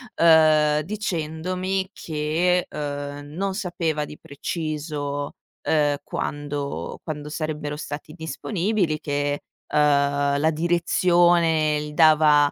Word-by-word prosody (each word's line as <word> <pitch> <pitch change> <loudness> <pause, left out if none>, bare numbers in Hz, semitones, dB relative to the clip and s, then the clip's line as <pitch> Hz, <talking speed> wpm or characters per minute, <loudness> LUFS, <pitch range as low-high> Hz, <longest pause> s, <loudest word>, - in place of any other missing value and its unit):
ehm, 155 -2 +5
dicendomi 185 +1 -2
che, 165 +3 0
ehm, 145 -1 -5
non 190 +6 -3
sapeva 170 -6 -2
di 150 - -11
preciso, 145 -1 -4 0.3
ehm, 145 -2 +2
quando 145 -1 -4
quando 150 -2 -5
sarebbero 150 -1 -3
stati 150 0 -7
disponibili, 175 +1 -1
che, 145 -1 -1 0.3
ehm, 140 -1 +2
la 155 +2 +3
direzione 170 -1 +3
gli 150 0 -7
dava, 150 -2 +5
155 Hz, 95 wpm, -24 LUFS, 145-170 Hz, 0.3 s, ehm